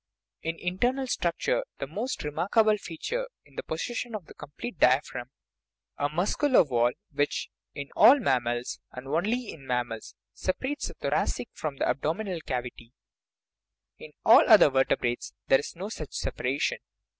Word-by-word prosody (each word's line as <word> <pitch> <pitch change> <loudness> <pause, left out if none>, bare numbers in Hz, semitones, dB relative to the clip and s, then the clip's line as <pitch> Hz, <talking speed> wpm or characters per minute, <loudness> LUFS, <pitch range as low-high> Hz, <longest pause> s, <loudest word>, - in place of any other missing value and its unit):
In 165 +1 -2
internal 245 +11 0
structure 260 - 0
the - - -3
most 260 - -4
remarkable 195 +9 +2
feature 470 - -4 0.2
is - - -22
the - - -3
possession 235 +8 -4
of 195 -7 -7
a - - -12
complete 155 - -8
diaphragm, 125 -1 +2 0.7
a 145 - +1
muscular 200 - +3
wall 120 -5 +2 0.2
which, 145 0 -1 0.3
in 140 -1 -6
all 275 - +8
mammals 120 - 0
and 125 +1 -9
only 210 - 0
in 135 -4 -12
mammals 120 -3 -3 0.2
separates 260 +10 -2
the - - -9
thoracic 240 - -1
from 150 -3 -4
the - - 0
abdominal 170 +5 -1
cavity; 125 -3 -5 1.1
in - - -10
all - - +9
other 145 - +8
vertebrates 125 -2 0 0.2
there 135 - +6
is 145 - -7
no 185 +4 -5
such 155 -9 -7
separation. 130 +3 -1
160 Hz, 145 wpm, -28 LUFS, 130-220 Hz, 1.1 s, all